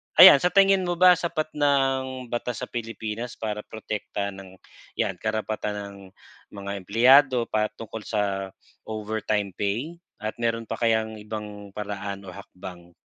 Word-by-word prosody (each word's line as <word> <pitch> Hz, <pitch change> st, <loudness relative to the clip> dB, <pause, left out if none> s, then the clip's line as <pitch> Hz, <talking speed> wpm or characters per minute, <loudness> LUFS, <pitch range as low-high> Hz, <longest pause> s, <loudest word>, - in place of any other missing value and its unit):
ayan, 140 Hz, -, +11 dB
sa 180 Hz, -, +3 dB
tingin 195 Hz, -2 st, +4 dB
mo 175 Hz, -, 0 dB
ba 180 Hz, +1 st, +7 dB
sapat 160 Hz, -3 st, -2 dB
na 135 Hz, -2 st, +3 dB
ang 130 Hz, -2 st, -7 dB
batas 120 Hz, -1 st, -3 dB
sa -, -, -4 dB
Pilipinas 115 Hz, 0 st, -5 dB
para 105 Hz, -1 st, -3 dB
protektahan 100 Hz, -2 st, -4 dB
ang 95 Hz, -, -14 dB, 0.5 s
'yan 95 Hz, -, 0 dB
karapatan 110 Hz, -1 st, -2 dB
ng 100 Hz, -1 st, -7 dB, 0.6 s
mga 100 Hz, 0 st, -5 dB
empleyado 125 Hz, +4 st, +5 dB
patungkol 110 Hz, +1 st, -2 dB
sa 105 Hz, -2 st, 0 dB, 0.7 s
overtime 110 Hz, -2 st, -2 dB
pay 120 Hz, +12 st, -2 dB, 0.2 s
at 110 Hz, 0 st, -5 dB
mayro'n 115 Hz, -1 st, 0 dB
pa -, -, -6 dB
kayang 110 Hz, -1 st, +1 dB
ibang 105 Hz, -2 st, -8 dB
paraan 100 Hz, -1 st, -5 dB
o 95 Hz, -, -9 dB
hakbang? 90 Hz, -1 st, -11 dB
110 Hz, 140 wpm, -25 LUFS, 105-130 Hz, 0.7 s, ayan